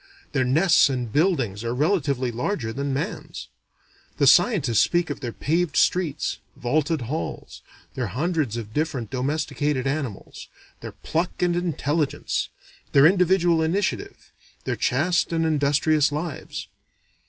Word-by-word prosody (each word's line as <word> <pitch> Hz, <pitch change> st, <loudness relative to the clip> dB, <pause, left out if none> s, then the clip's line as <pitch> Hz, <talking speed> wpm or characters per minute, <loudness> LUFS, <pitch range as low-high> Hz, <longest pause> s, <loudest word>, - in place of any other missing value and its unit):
Their 130 Hz, -3 st, +1 dB
nests 160 Hz, +4 st, +4 dB
and 125 Hz, -4 st, -3 dB
buildings 135 Hz, -, +1 dB
are 115 Hz, +1 st, -2 dB
relatively 140 Hz, -5 st, 0 dB
larger 120 Hz, -, -2 dB
than 140 Hz, +2 st, -3 dB
man's. 150 Hz, +10 st, -5 dB, 0.7 s
The -, -, +3 dB
scientists 145 Hz, -, +4 dB
speak 175 Hz, -3 st, +2 dB
of -, -, -5 dB
their 120 Hz, -4 st, -4 dB
paved 165 Hz, +4 st, -1 dB
streets, 165 Hz, -5 st, +1 dB, 0.2 s
vaulted 150 Hz, +4 st, 0 dB
halls, 135 Hz, +7 st, -5 dB, 0.3 s
their 125 Hz, -3 st, -2 dB
hundreds 145 Hz, -, -1 dB
of 110 Hz, -2 st, -7 dB
different 145 Hz, -7 st, -2 dB
domesticated 145 Hz, 0 st, -1 dB
animals, 135 Hz, -7 st, -4 dB, 0.3 s
their -, -, -8 dB
pluck 170 Hz, +2 st, -2 dB
and 175 Hz, -1 st, +2 dB
intelligence, 160 Hz, -3 st, -1 dB, 0.4 s
their 140 Hz, +1 st, +7 dB
individual 175 Hz, -1 st, +4 dB
initiative, 180 Hz, +6 st, -2 dB, 0.3 s
their -, -, -2 dB
chaste 170 Hz, +9 st, +1 dB
and 165 Hz, -1 st, +1 dB
industrious 150 Hz, 0 st, +2 dB
lives. 150 Hz, +1 st, -5 dB
150 Hz, 125 wpm, -24 LUFS, 130-170 Hz, 0.7 s, their